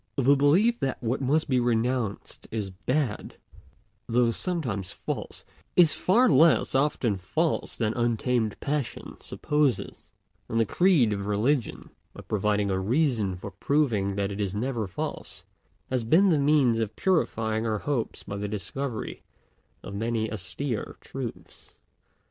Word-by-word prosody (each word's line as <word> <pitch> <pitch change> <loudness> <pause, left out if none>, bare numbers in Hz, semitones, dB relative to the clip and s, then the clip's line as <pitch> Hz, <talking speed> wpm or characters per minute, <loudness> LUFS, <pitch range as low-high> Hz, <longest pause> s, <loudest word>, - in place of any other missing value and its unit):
The 140 0 +4
belief 180 +13 +3
that 135 -3 -1
what 120 +4 -1
must 150 +5 +1
be 130 -3 +2
renounced 120 -2 -1
is 105 -4 -3
bad, 125 +5 -2 0.7
though 120 0 +3
sometimes 120 - -2
false, - - -5 0.3
is 165 -4 +6
far 200 - +3
less 155 +3 +4
often 135 -6 +1
false 95 -1 -1
than 110 -1 0
untamed 120 -1 0
passion 145 -3 -3
supposes; 150 -7 -1 0.4
and 115 - 0
the 115 - +3
creed 150 - +3
of 100 0 -4
religion, 115 +6 0 0.2
by - - -8
providing 105 -1 0
a 95 - 0
reason 115 - +1
for 95 +3 -8
proving 105 -3 0
that 100 0 -1
it 100 +1 -4
is 100 -1 -2
never 115 -1 -2
false, 90 - -6 0.5
has 130 -2 0
been 170 - +4
the 160 -4 +3
means 140 -5 +3
of 110 -1 -2
purifying 115 - 0
our 110 -1 0
hopes 125 0 -3
by 100 - -6
the 105 +1 -3
discovery 110 +4 -4 0.6
of 100 - -8
many 110 +1 -1
austere 110 +4 -4
truths. - - -8
120 Hz, 140 wpm, -27 LUFS, 105-145 Hz, 0.7 s, is